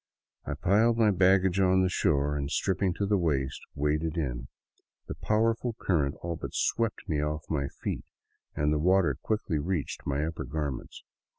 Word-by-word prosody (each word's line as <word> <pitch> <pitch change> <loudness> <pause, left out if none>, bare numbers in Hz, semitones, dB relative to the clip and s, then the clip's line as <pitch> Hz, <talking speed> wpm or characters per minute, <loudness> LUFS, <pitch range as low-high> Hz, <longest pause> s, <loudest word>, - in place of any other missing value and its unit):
I - - -2
piled 110 +5 +3
my 110 -2 +4
baggage 95 0 +3
on 95 0 +4
the - - +3
shore 75 -5 +1
and, 70 -1 -2
stripping 95 +2 0
to 100 - -1
the 100 0 +2
waist, 70 -6 -1
waded 75 +2 0
in. - - -3 0.6
The - - -5
powerful 115 +2 0
current 75 -10 0
all 85 0 -2
but - - -7
swept 115 -3 0
me 75 -5 0
off 75 +1 -2
my 70 -3 0
feet - - -5 0.5
and 75 +1 +1
the 75 - +1
water 90 -3 +3
quickly 105 -8 -1
reached 80 -2 -3
my 70 +2 0
upper 80 +1 -4
garments. 70 -2 -5
85 Hz, 170 wpm, -29 LUFS, 75-95 Hz, 0.6 s, my